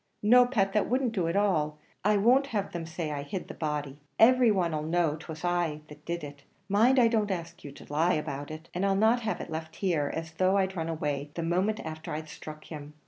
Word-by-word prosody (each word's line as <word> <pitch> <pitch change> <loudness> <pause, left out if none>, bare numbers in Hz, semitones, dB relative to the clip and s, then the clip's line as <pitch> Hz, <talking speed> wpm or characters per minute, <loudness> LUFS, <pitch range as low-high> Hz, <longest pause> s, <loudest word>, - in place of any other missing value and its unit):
"No, 245 +3 +7
Pat; 195 -6 +1
that 210 - +1
wouldn't 255 0 +1
do 185 -7 -1
at 170 - -1
all. 160 -7 +1 0.3
I 210 +1 +3
won't 250 +7 +4
have 210 -7 -2
them 170 -2 -5
say 160 -1 -4
I 145 -1 -3
hid 175 +6 -5
the - - -7
body; 150 -2 -3 0.2
every 250 +1 +6
one 180 -6 +1
'll 150 - -1
know 160 -1 +1
'twas 160 +1 -8
I 175 -4 0 0.3
did 170 -1 -3
it; 145 -1 -9 0.3
mind, 225 +7 +4
I 240 -2 +6
don't 220 -3 +1
ask 170 -3 -5
you 145 - -8
to - - -13
tell 145 - -7
a - - 0
lie 175 +3 +4
about 145 -2 -3
it; 155 +1 -8
and 180 - -2
I'll 195 -1 +2
not 220 +4 +4
have 220 -2 -2
it - - -7
left 160 0 -5
here, 165 -7 0
as 160 0 -5
though 185 +4 +2
I'd 190 0 0
run 165 -2 -2
away 145 -3 -2
the 170 - -2
moment 185 +6 0
afther 155 0 -6
I 155 - -4
struck 155 0 -10
him. 150 -1 -9
170 Hz, 245 wpm, -29 LUFS, 155-205 Hz, 0.3 s, No